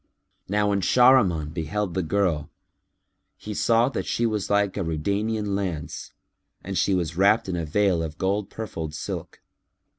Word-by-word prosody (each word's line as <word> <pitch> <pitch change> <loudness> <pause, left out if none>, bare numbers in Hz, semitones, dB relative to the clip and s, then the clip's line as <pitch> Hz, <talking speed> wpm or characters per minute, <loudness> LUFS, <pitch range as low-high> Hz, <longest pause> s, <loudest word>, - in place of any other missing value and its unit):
Now 105 +1 +2
when 100 -1 +1
Shahriman 95 - +4
beheld 90 +4 -2
the 95 - 0
girl, 85 -3 0 0.9
he 105 - -7
saw 115 +3 +3
that - - -4
she 120 - 0
was 105 -3 -1
like 100 -1 +2
a 100 - -1
Rudaynian 100 +6 -1
lance,[FN#303] 90 -2 -7
and 95 - -3
she 95 +1 +2
was 85 -3 -2
wrapped 100 +3 +4
in 90 - -2
a 85 -2 -2
veil 95 +1 +2
of 80 -2 -5
gold 100 +3 -1
purfled 80 -8 -6
silk. - - -6
100 Hz, 155 wpm, -25 LUFS, 85-105 Hz, 0.9 s, Shahriman